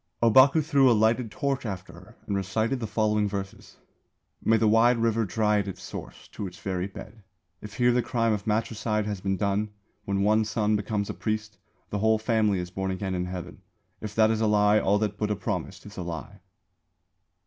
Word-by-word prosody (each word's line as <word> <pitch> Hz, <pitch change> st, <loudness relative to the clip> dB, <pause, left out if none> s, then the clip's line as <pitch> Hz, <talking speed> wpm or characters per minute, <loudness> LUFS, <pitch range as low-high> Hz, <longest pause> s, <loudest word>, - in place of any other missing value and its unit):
Ōbaku 130 Hz, +6 st, +6 dB
threw 140 Hz, -4 st, +4 dB
a -, -, +6 dB
lighted 115 Hz, +2 st, +2 dB
torch 140 Hz, +4 st, -2 dB
after 95 Hz, -5 st, -6 dB
her 90 Hz, +7 st, -15 dB
and 100 Hz, -, -2 dB
recited 110 Hz, +7 st, -1 dB
the 115 Hz, -, -3 dB
following 105 Hz, 0 st, +1 dB
verses: 95 Hz, -1 st, -7 dB, 0.7 s
_May 115 Hz, -, +4 dB
the 110 Hz, -, +3 dB
wide 115 Hz, +3 st, +5 dB
river 115 Hz, -1 st, +1 dB
dry 105 Hz, +2 st, +1 dB
at 100 Hz, -, -3 dB
its 95 Hz, -, -7 dB
source, -, -, -9 dB
to 100 Hz, -, -5 dB
its 90 Hz, -1 st, -11 dB
very 95 Hz, -1 st, -3 dB
bed 105 Hz, +2 st, -11 dB, 0.4 s
If 105 Hz, -1 st, -9 dB
here 125 Hz, 0 st, +3 dB
the 125 Hz, +1 st, +2 dB
crime 115 Hz, -1 st, 0 dB
of 105 Hz, +1 st, -4 dB
matricide 110 Hz, -1 st, 0 dB
has 105 Hz, -3 st, -4 dB
been 95 Hz, 0 st, -1 dB
done; 100 Hz, +2 st, 0 dB, 0.4 s
When 100 Hz, 0 st, 0 dB
one 110 Hz, +2 st, +3 dB
son 110 Hz, 0 st, 0 dB
becomes 105 Hz, 0 st, -2 dB
a -, -, -6 dB
priest, 110 Hz, -1 st, -4 dB, 0.3 s
the 105 Hz, -, -1 dB
whole 110 Hz, +1 st, +3 dB
family 110 Hz, -2 st, +1 dB
is 90 Hz, 0 st, -4 dB
born 95 Hz, +1 st, -3 dB
again 95 Hz, 0 st, -3 dB
in 90 Hz, -1 st, -1 dB
Heaven; 90 Hz, 0 st, -7 dB, 0.4 s
If 105 Hz, -1 st, -6 dB
that 110 Hz, 0 st, +4 dB
is 110 Hz, 0 st, 0 dB
a 110 Hz, -, +3 dB
lie, 105 Hz, 0 st, +4 dB
all 100 Hz, +1 st, +2 dB
that 105 Hz, -1 st, -2 dB
Buddha 105 Hz, -1 st, 0 dB
promised 95 Hz, -, -4 dB
is 105 Hz, -, -12 dB
a -, -, -3 dB
lie. 85 Hz, -4 st, -7 dB
105 Hz, 205 wpm, -26 LUFS, 100-110 Hz, 0.7 s, Ōbaku